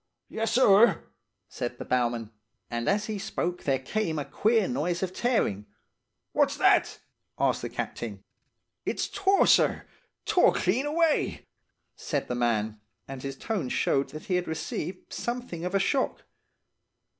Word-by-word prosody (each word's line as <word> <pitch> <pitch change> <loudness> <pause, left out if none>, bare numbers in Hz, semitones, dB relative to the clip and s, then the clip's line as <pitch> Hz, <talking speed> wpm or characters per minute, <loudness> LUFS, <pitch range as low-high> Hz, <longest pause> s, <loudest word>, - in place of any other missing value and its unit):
"'Yessir!' 225 -3 +4 0.4
said 120 0 -5
the - - -7
bowman; 120 -3 0 0.4
and 120 0 -1
as 205 +2 +1
he 215 -2 -4
spoke 185 -4 -3
there 135 -2 +2
came 160 +5 -2
a 145 - -2
queer 220 -2 +2
noise 180 -8 -1
of 185 -1 -2
tearing. 185 - 0 0.6
"'What's - - +2
that?' - - +3 0.4
asked - - +1
the - - -4
Captain. 100 -4 -5 0.6
"'It's - - -1
tore, 395 0 +3
sir. - - +4 0.4
Tore 360 - +4
clean 240 +10 +1
away!' 320 +1 +1 0.5
said 145 -3 -3
the - - -2
man, 110 -3 0 0.3
and 135 -1 -7
his 135 0 -5
tone 195 - -2
showed 135 +2 +1
that 155 - -8
he 180 - +1
had 180 - -2
received 160 +2 -5
something 240 -9 -4
of 180 +2 -2
a - - +4
shock. 260 +7 0
180 Hz, 145 wpm, -27 LUFS, -, 0.6 s, Yessir